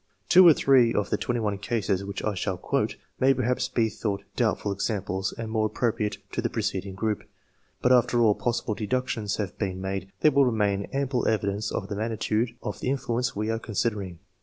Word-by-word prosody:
Two 185 0 +8
or 165 - +9
three, 125 -4 +4
of 105 - 0
the - - +3
21 110 -5 -1
cases 100 -3 -1
which 100 0 -5
I 110 - 0
shall 95 -1 -2
quote, - - -1 0.2
may 135 +1 +4
perhaps 125 0 0
be 115 -2 +2
thought 100 -2 -3
doubtful 100 - 0
examples 95 -1 -2
and 115 -1 -5
more 110 -1 +2
appropriate 110 -2 -1
to - - -2
the - - -1
preceding 95 0 -3
group; 105 +1 -1 0.6
but 125 - +4
after 120 -1 +4
all 110 -3 +5
possible 120 0 -1
deductions 110 -1 -2
have 100 -4 -4
been 95 -3 -2
made, 95 0 -4
there 155 - +6
will 140 0 +5
remain 100 -4 +1
ample 135 -2 0
evidence 105 -1 0
of 95 - -3
the 100 - -4
magnitude 110 +2 -1
of - - -4
the - - -2
influence 125 -2 -1
we 110 +2 -1
are 115 - -1
considering. 105 -5 -2
110 Hz, 190 wpm, -26 LUFS, 100-120 Hz, 0.6 s, or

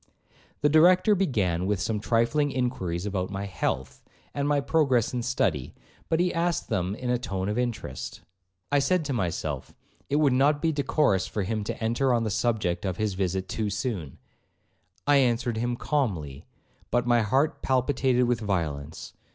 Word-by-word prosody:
The 150 - +4
Director 180 +7 +5
began 100 - 0
with 105 -2 0
some 110 +1 -1
trifling 120 +7 +1
inquiries 100 -10 -2
about 95 -3 -2
my 100 0 -4
health, 65 -8 -3 0.3
and 140 0 -1
my 145 -1 +3
progress 135 -6 +2
in 125 - -1
study, 90 - -1 0.3
but 160 - +2
he 180 0 +2
asked 170 -3 -1
them 95 -3 -1
in 125 +1 -3
a 125 - +1
tone 95 -4 -3
of 105 +3 -1
interest. 115 - -4 0.5
I 145 - +4
said 160 +4 +1
to 140 - -2
myself, 95 -9 -3 0.3
it 140 - 0
would 145 -3 +4
not 145 +3 +3
be 165 +1 +1
decorous 145 -9 +1
for 105 - -2
him 110 +2 -2
to - - -3
enter 120 +3 +2
on 115 - +1
the 110 - -1
subject 95 -6 0
of 95 -3 -2
his 105 -2 -1
visit 95 0 -2
too 110 +1 -2
soon;—I 100 - -4
answered 120 -3 +1
him 120 +2 -1
calmly, 90 - -2 0.4
but 120 0 +1
my 120 -1 +4
heart 135 +9 +1
palpitated 130 -1 +2
with 120 -1 +1
violence. 80 -7 -3
120 Hz, 170 wpm, -27 LUFS, 95-140 Hz, 0.5 s, Director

